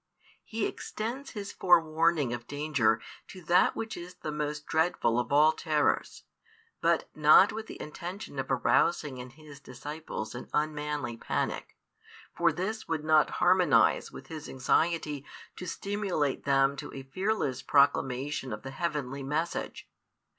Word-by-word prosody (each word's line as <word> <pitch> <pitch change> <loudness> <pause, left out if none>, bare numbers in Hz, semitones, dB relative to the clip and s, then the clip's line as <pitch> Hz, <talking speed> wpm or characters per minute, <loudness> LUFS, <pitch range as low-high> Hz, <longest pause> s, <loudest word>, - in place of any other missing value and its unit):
He 220 -1 -2
extends 245 +6 -5
His 205 -3 -5
forewarning 160 -5 +3
of 120 0 -6
danger 145 -7 +1 0.3
to 185 -2 -11
that 175 +3 +4
which 225 0 -4
is 175 +1 -9
the 155 - -5
most 150 0 -3
dreadful 160 -7 +1
of 120 - -3
all 150 +2 +6
terrors, 155 -2 0 0.6
but 170 0 +2
not 155 +6 +6
with 220 0 -6
the - - -9
intention 175 0 -7
of 135 - -3
arousing 150 -6 +2
in 125 +1 -7
His 150 +1 -14
disciples 140 -4 -7
an 120 - -8
unmanly 150 -5 -1
panic. - - -3 0.6
For - - +3
|435 - - -4
this 215 +5 -3
would 160 -2 -2
not 155 -1 +4
harmonise 180 -4 +3
with 135 - -10
His 155 +1 -8
anxiety 150 +2 0 0.3
to 180 - -7
stimulate 195 -7 -2
them 135 0 +3
to - - -7
a 135 - -6
fearless 165 - -1
proclamation 135 -1 +1
of 105 0 -6
the 135 - -6
heavenly 140 -3 -3
message. 150 +5 -3
150 Hz, 145 wpm, -29 LUFS, 135-175 Hz, 0.6 s, all